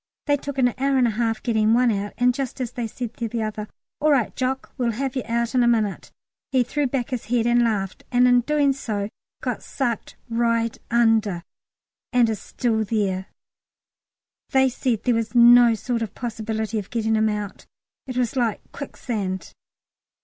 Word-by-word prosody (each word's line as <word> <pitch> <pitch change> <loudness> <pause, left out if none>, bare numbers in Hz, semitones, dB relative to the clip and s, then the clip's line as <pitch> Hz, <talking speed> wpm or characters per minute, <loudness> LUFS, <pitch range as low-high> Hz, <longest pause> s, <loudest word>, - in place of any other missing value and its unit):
They 290 - +3
took 285 -1 -6
an 250 -2 +4
hour 275 0 +2
and 255 - +4
a 235 - +2
half 225 0 -1
getting 220 -2 +3
one 245 -1 +4
out, 205 0 -3
and 250 0 +3
just 265 -1 -4
as 245 -2 -3
they 240 -2 -3
said 235 +1 -6
to 235 - -2
the 230 0 -2
other, 215 0 -4 0.3
"All 305 - +2
right, 270 -6 +2
Jock, 265 +1 -2
we'll 240 -4 0
have 265 +3 -3
you 260 - 0
out 235 +1 0
in 255 - +3
a 240 - +4
minute," 220 -4 0 0.4
he 260 -2 +3
threw 285 +4 -1
back 250 -1 -2
his 250 -4 -3
head 230 +1 +1
and 240 0 +4
laughed, 200 -5 -1
and 250 0 +5
in 245 0 +5
doing 285 +1 +2
so 210 -6 -3 0.3
got - - -2
sucked 240 -6 -3
right 230 -1 +1
under, 225 -6 +2 0.7
and 245 -3 +4
is 215 - -4
there 225 -3 +1
still. 195 -4 0 1.2
They 265 0 +4
said 245 -3 -1
there 245 - +2
was 225 0 -2
no 240 -1 +7
sort 235 +1 -2
of 225 - -4
possibility 220 -2 -3
of 200 - -8
getting 225 -2 0
him 220 0 +3
out; 210 -1 -5 0.4
it 255 -1 -5
was 250 +1 0
like 235 -5 +1
a - - -31
quicksand. 210 -9 -5
235 Hz, 190 wpm, -23 LUFS, 220-250 Hz, 1.2 s, no